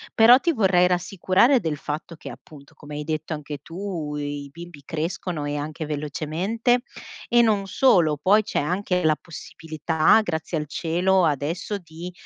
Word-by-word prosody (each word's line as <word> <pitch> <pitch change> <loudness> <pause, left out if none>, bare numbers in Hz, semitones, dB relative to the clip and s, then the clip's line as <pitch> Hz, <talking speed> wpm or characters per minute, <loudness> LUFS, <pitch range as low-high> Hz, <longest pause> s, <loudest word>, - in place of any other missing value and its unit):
Però 235 +3 +7
ti 340 - +1
vorrei 190 - +3
rassicurare 185 +7 +2
del 160 -7 -3
fatto 150 +3 -6
che, - - -9
appunto, 145 -1 -15
come 150 -1 -10
hai 150 - -4
detto 155 +1 -3
anche 150 -1 -7
tu, 165 -2 -6
i 145 -1 -5
bimbi 170 -1 -11
crescono 160 +1 -4
e 145 0 -3
anche 155 +2 -5
velocemente 160 - -1 0.5
e 240 0 +5
non 200 -2 -2
solo, 180 - +3
poi 200 +8 +3
c'è - - -2
anche 180 +3 -1
la 155 -1 +3
possibilità, 160 +3 0
grazie 160 -3 -3
al 150 -1 -4
cielo, 175 +4 +1
adesso 160 +7 -2
di, 170 -1 -9
165 Hz, 155 wpm, -23 LUFS, 150-190 Hz, 0.5 s, Però